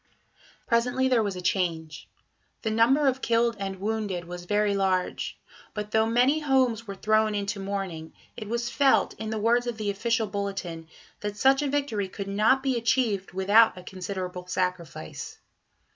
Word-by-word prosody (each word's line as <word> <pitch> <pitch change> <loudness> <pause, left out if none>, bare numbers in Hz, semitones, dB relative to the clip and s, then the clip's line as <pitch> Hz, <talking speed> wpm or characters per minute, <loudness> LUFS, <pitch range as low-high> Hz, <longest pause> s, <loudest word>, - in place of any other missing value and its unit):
Presently 250 +2 +2
there 245 -3 +4
was 200 -3 -2
a 180 - -7
change. 165 -5 -2 0.5
The 220 - 0
number 240 +7 +4
of 265 -1 +1
killed 230 0 +2
and 195 -1 -4
wounded 205 -4 -2
was 175 +1 -8
very 205 +2 +1
large; 190 -2 -1 0.4
but 210 0 -4
though 220 0 +3
many 250 +6 +3
homes 260 -6 +1
were 200 - -5
thrown 215 +1 +2
into 200 +1 -2
mourning, 195 -5 -4 0.2
it 215 -3 -7
was 235 +1 -1
felt, 270 +3 +3
in 220 0 -4
the 220 - -2
words 235 +3 +2
of 235 -2 -3
the 210 -2 -1
official 225 +3 0
bulletin, 195 -5 -4 0.3
that 205 0 -4
such 270 +5 +4
a 290 - 0
victory 265 -9 -1
"could 195 +1 -7
not 215 +7 +3
be 265 -3 +1
achieved 225 -6 0
without 200 +3 +4
a 180 - -9
considerable 180 -1 -6
sacrifice." 180 - -4
210 Hz, 165 wpm, -27 LUFS, 190-235 Hz, 0.5 s, there